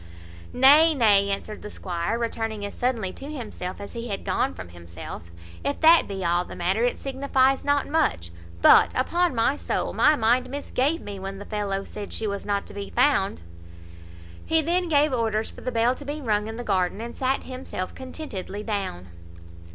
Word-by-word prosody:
"Nay, 295 Hz, +5 st, +6 dB
nay," 205 Hz, -5 st, +4 dB
answered 200 Hz, +2 st, -4 dB
the 210 Hz, -, -7 dB
squire, 180 Hz, +3 st, -3 dB
returning 225 Hz, -3 st, -3 dB
as 200 Hz, -, -6 dB
suddenly 230 Hz, -7 st, -1 dB
to 280 Hz, +2 st, -8 dB
himself, 215 Hz, -9 st, -6 dB
as 200 Hz, -, -8 dB
he 235 Hz, 0 st, -5 dB
had 200 Hz, -3 st, -4 dB
gone 90 Hz, -, 0 dB
from 90 Hz, 0 st, -9 dB
himself; 85 Hz, -1 st, -9 dB, 0.3 s
"if 285 Hz, -, -2 dB
that 325 Hz, +1 st, +7 dB
be 195 Hz, -2 st, -4 dB
all 175 Hz, +1 st, +2 dB
the -, -, -10 dB
matter, 190 Hz, +6 st, 0 dB
it 245 Hz, -, +1 dB
signifies 270 Hz, 0 st, +1 dB
not 285 Hz, 0 st, +1 dB
much; 290 Hz, -, 0 dB, 0.3 s
but, -, -, +8 dB
upon 340 Hz, +4 st, +1 dB
my 230 Hz, +4 st, +2 dB
soul, -, -, -2 dB
my 305 Hz, -, +4 dB
mind 240 Hz, 0 st, +2 dB
misgave 285 Hz, +2 st, -1 dB
me 200 Hz, -1 st, -7 dB
when 195 Hz, +1 st, -6 dB
the 205 Hz, -, -8 dB
fellow 200 Hz, -2 st, -2 dB
said 205 Hz, 0 st, -8 dB
she 225 Hz, -, -2 dB
was 200 Hz, -1 st, -4 dB
not 200 Hz, -1 st, 0 dB
to -, -, -10 dB
be 200 Hz, -1 st, -6 dB
found." 235 Hz, -, +2 dB, 1.0 s
He 320 Hz, -, +2 dB
then 345 Hz, +3 st, 0 dB
gave 295 Hz, -2 st, +3 dB
orders 225 Hz, -2 st, 0 dB
for -, -, -13 dB
the 255 Hz, -, -3 dB
bell 235 Hz, +1 st, +2 dB
to 285 Hz, -, -10 dB
be 290 Hz, +2 st, -4 dB
rung 215 Hz, -6 st, 0 dB
in 225 Hz, -, -6 dB
the 245 Hz, -, -5 dB
garden, 190 Hz, -2 st, 0 dB
and 235 Hz, +1 st, -6 dB
sat 265 Hz, +1 st, 0 dB
himself 255 Hz, -8 st, -6 dB
contentedly 255 Hz, -7 st, -6 dB
down. 195 Hz, -, -4 dB
225 Hz, 190 wpm, -25 LUFS, 195-270 Hz, 1.0 s, but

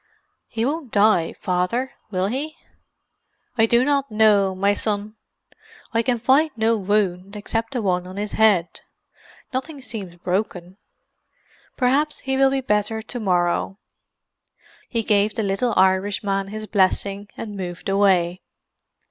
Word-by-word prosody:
"He 225 Hz, 0 st, -2 dB
won't 285 Hz, -2 st, -3 dB
die, 205 Hz, -5 st, +3 dB
Father, 185 Hz, +9 st, -1 dB, 0.2 s
will 185 Hz, -2 st, -1 dB
he?" 275 Hz, +9 st, -3 dB, 1.0 s
"I 225 Hz, -2 st, +4 dB
do 240 Hz, +2 st, +3 dB
not 280 Hz, -1 st, +1 dB
know, 210 Hz, -3 st, +3 dB
my 200 Hz, +2 st, +2 dB
son. 210 Hz, 0 st, -2 dB, 0.8 s
I 230 Hz, -, +3 dB
can 245 Hz, +1 st, 0 dB
find 265 Hz, +7 st, +3 dB
no 225 Hz, +1 st, +2 dB
wound, 200 Hz, -1 st, -1 dB
except 225 Hz, +3 st, -3 dB
the 245 Hz, -4 st, -2 dB
one 180 Hz, -2 st, 0 dB
on 185 Hz, +1 st, -9 dB
his 205 Hz, 0 st, -3 dB
head—nothing 220 Hz, -, -2 dB
seems 200 Hz, -8 st, -7 dB
broken. 180 Hz, 0 st, -3 dB, 1.0 s
Perhaps 285 Hz, +4 st, +1 dB
he 265 Hz, 0 st, -1 dB
will 270 Hz, 0 st, +4 dB
be 270 Hz, 0 st, 0 dB
better 215 Hz, -1 st, 0 dB
to 245 Hz, +2 st, -6 dB
morrow." 180 Hz, -1 st, 0 dB, 1.1 s
He 230 Hz, -2 st, -1 dB
gave 205 Hz, 0 st, +2 dB
the 220 Hz, -, -1 dB
little 200 Hz, +4 st, 0 dB
Irishman 195 Hz, +1 st, +2 dB
his 215 Hz, +2 st, -6 dB
blessing 200 Hz, 0 st, 0 dB
and 210 Hz, -2 st, -6 dB
moved 180 Hz, -2 st, -6 dB
away. 190 Hz, -3 st, +2 dB
210 Hz, 130 wpm, -22 LUFS, 190-235 Hz, 1.1 s, I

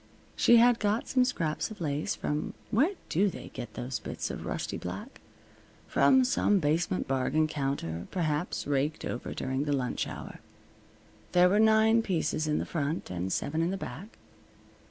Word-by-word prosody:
She 235 Hz, -, +6 dB
had 240 Hz, 0 st, +5 dB
got 210 Hz, +2 st, 0 dB
some 255 Hz, -1 st, +3 dB
scraps 165 Hz, -11 st, -1 dB
of 215 Hz, -, -10 dB
lace 150 Hz, -2 st, -1 dB
from 150 Hz, +1 st, -3 dB, 0.2 s
Where 300 Hz, -, +3 dB
do 195 Hz, +5 st, +2 dB
they -, -, -8 dB
get 110 Hz, -3 st, -8 dB
those 125 Hz, -1 st, -3 dB
bits -, -, -4 dB
of -, -, -6 dB
rusty -, -, -3 dB
black? 210 Hz, -, -7 dB, 0.6 s
From 265 Hz, -1 st, +4 dB
some 210 Hz, -4 st, +2 dB
basement 165 Hz, +2 st, 0 dB
bargain 135 Hz, +4 st, +1 dB
counter, 135 Hz, -, -3 dB
perhaps, 160 Hz, -2 st, -1 dB
raked 145 Hz, +2 st, -1 dB
over 120 Hz, -, -4 dB
during 130 Hz, +2 st, -2 dB
the 145 Hz, -, 0 dB
lunch 130 Hz, -3 st, -1 dB
hour. -, -, -8 dB, 0.9 s
There 180 Hz, 0 st, +6 dB
were 205 Hz, +3 st, +3 dB
nine 220 Hz, +1 st, +5 dB
pieces 165 Hz, -6 st, -1 dB
in 150 Hz, -, +1 dB
the -, -, -1 dB
front, 155 Hz, -, -3 dB
and 90 Hz, +1 st, -3 dB
seven 155 Hz, -, -1 dB
in 165 Hz, -, +1 dB
the 195 Hz, -, -2 dB
back. 185 Hz, -, -8 dB
160 Hz, 165 wpm, -29 LUFS, 140-210 Hz, 0.9 s, She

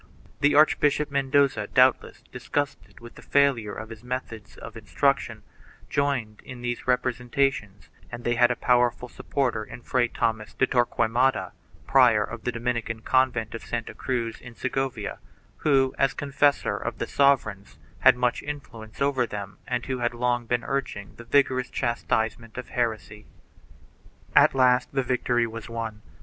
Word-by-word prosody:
1 -, -, -27 dB, 0.3 s
The 145 Hz, +1 st, +3 dB
Archbishop 150 Hz, -1 st, +3 dB
Mendoza, 140 Hz, -5 st, +2 dB
doubtless 130 Hz, 0 st, +2 dB
disgusted 145 Hz, -2 st, -4 dB
with 120 Hz, 0 st, -11 dB
the -, -, -14 dB
failure 135 Hz, -7 st, +1 dB
of 110 Hz, -, -7 dB
his 115 Hz, 0 st, -10 dB
methods 125 Hz, -4 st, -6 dB
of -, -, -10 dB
instruction, -, -, -1 dB, 0.5 s
joined 135 Hz, -7 st, -1 dB
in 125 Hz, -1 st, -10 dB
these 120 Hz, 0 st, -4 dB
representations 125 Hz, -4 st, -1 dB, 0.2 s
and 120 Hz, 0 st, -7 dB
they 120 Hz, -, +1 dB
had 120 Hz, 0 st, +4 dB
a 125 Hz, -, 0 dB
powerful 125 Hz, 0 st, +1 dB
supporter 120 Hz, -3 st, -2 dB
in 120 Hz, -, -11 dB
Fray 125 Hz, -2 st, +1 dB
Thomas 110 Hz, -2 st, -2 dB
de -, -, +3 dB
Torquemada, 125 Hz, +1 st, +1 dB, 0.3 s
prior -, -, +5 dB
of -, -, -8 dB
the 125 Hz, -, +1 dB
Dominican 115 Hz, -1 st, -3 dB
convent 130 Hz, -4 st, +1 dB
of 115 Hz, -, -7 dB
Santa 120 Hz, -1 st, -4 dB
Cruz 120 Hz, -3 st, -3 dB
in 125 Hz, -2 st, -11 dB
Segovia, 130 Hz, -5 st, -3 dB, 0.4 s
who, 135 Hz, -3 st, +2 dB
as 135 Hz, 0 st, +2 dB
confessor 145 Hz, 0 st, +1 dB
of -, -, -5 dB
the -, -, -2 dB
sovereigns, 115 Hz, -8 st, +1 dB, 0.2 s
had -, -, +6 dB
much 125 Hz, -1 st, 0 dB
influence 125 Hz, -6 st, -6 dB
over 135 Hz, -3 st, +1 dB
them 100 Hz, -2 st, -7 dB
and 125 Hz, -1 st, -2 dB
who 130 Hz, -1 st, -3 dB
had 120 Hz, 0 st, -1 dB
long 120 Hz, -1 st, 0 dB
been 120 Hz, 0 st, 0 dB
urging 130 Hz, -7 st, -4 dB
the 120 Hz, -, -11 dB
vigorous 130 Hz, -1 st, +2 dB
chastisement 115 Hz, -1 st, -2 dB
of 125 Hz, -, -6 dB
heresy.2 110 Hz, -3 st, -3 dB, 1.1 s
At -, -, +6 dB
last 125 Hz, -1 st, +3 dB
the 135 Hz, -1 st, +1 dB
victory 125 Hz, -1 st, +1 dB
was 115 Hz, 0 st, -8 dB
won. 115 Hz, -2 st, -5 dB
125 Hz, 155 wpm, -25 LUFS, 115-135 Hz, 1.1 s, had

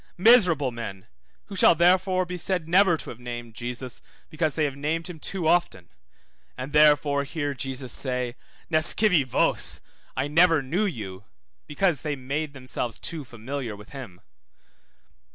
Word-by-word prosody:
Miserable 180 Hz, -, +5 dB
men, 100 Hz, -5 st, -7 dB, 0.4 s
who 200 Hz, -, -9 dB
shall 180 Hz, -, +6 dB
therefore 185 Hz, +2 st, +3 dB
be 180 Hz, +1 st, -5 dB
said 180 Hz, -1 st, -2 dB
never 180 Hz, 0 st, +4 dB
to -, -, -6 dB
have 120 Hz, -, -11 dB
named 120 Hz, -1 st, -7 dB
Jesus, 125 Hz, +2 st, -6 dB, 0.3 s
because 155 Hz, -2 st, -1 dB
they 155 Hz, -, +1 dB
have 140 Hz, -2 st, -3 dB
named 155 Hz, +3 st, -2 dB
him 175 Hz, -3 st, -8 dB
too 175 Hz, +1 st, -3 dB
often; 160 Hz, -, +1 dB, 0.7 s
and 130 Hz, +3 st, -6 dB
therefore 145 Hz, -1 st, +4 dB
hear 145 Hz, 0 st, -3 dB
Jesus 130 Hz, -1 st, -5 dB
say, 125 Hz, -2 st, -1 dB, 0.4 s
Nescivi 165 Hz, +2 st, +4 dB
vos, 130 Hz, -, 0 dB, 0.4 s
I 130 Hz, +2 st, 0 dB
never 165 Hz, 0 st, +4 dB
knew 175 Hz, +11 st, 0 dB
you, 100 Hz, -, -5 dB, 0.4 s
because 155 Hz, -1 st, 0 dB
they 150 Hz, -2 st, -2 dB
made 140 Hz, +3 st, -4 dB
themselves 130 Hz, -3 st, -4 dB
too 160 Hz, -3 st, -4 dB
familiar 120 Hz, -1 st, -6 dB
with 105 Hz, 0 st, -14 dB
him. 125 Hz, -11 st, -10 dB
145 Hz, 150 wpm, -25 LUFS, 125-170 Hz, 0.7 s, shall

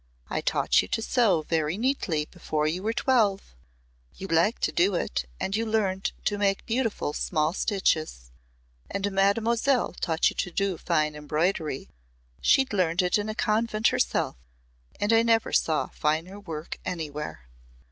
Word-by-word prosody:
"I -, -, -1 dB
taught -, -, +2 dB
you 90 Hz, -, -7 dB
to 225 Hz, -, -1 dB
sew 215 Hz, -11 st, +2 dB
very 160 Hz, +2 st, -1 dB
neatly 210 Hz, -, 0 dB
before 155 Hz, -3 st, -3 dB
you 165 Hz, +4 st, -1 dB
were 215 Hz, +3 st, 0 dB
twelve. 220 Hz, -, +1 dB, 0.6 s
You -, -, -7 dB
liked 170 Hz, +5 st, +1 dB
to -, -, +2 dB
do 185 Hz, +2 st, +2 dB
it 65 Hz, -, -2 dB
and 195 Hz, -, -1 dB
you 225 Hz, -, 0 dB
learned 205 Hz, -4 st, 0 dB
to 205 Hz, -1 st, 0 dB
make 195 Hz, -1 st, +1 dB
beautiful 225 Hz, -, -1 dB
small 155 Hz, 0 st, 0 dB
stitches. 155 Hz, -, -1 dB, 0.6 s
And 200 Hz, +1 st, -2 dB
Mademoiselle 225 Hz, +6 st, +2 dB
taught 165 Hz, -2 st, +1 dB
you -, -, -12 dB
to 180 Hz, -, -1 dB
do 195 Hz, -1 st, -1 dB
fine 155 Hz, -3 st, +1 dB
embroidery. 150 Hz, 0 st, -2 dB, 0.5 s
She'd 270 Hz, -4 st, +3 dB
learned 180 Hz, -2 st, +2 dB
it 180 Hz, +3 st, +2 dB
in 205 Hz, +1 st, -3 dB
a 215 Hz, -, -4 dB
convent 215 Hz, 0 st, +1 dB
herself -, -, 0 dB, 0.6 s
and 205 Hz, +2 st, +2 dB
I 225 Hz, -, +6 dB
never 230 Hz, -1 st, +2 dB
saw 160 Hz, -1 st, +1 dB
finer 165 Hz, +6 st, -2 dB
work 165 Hz, -5 st, -7 dB
anywhere." 150 Hz, -, -5 dB
190 Hz, 155 wpm, -26 LUFS, 155-215 Hz, 0.6 s, I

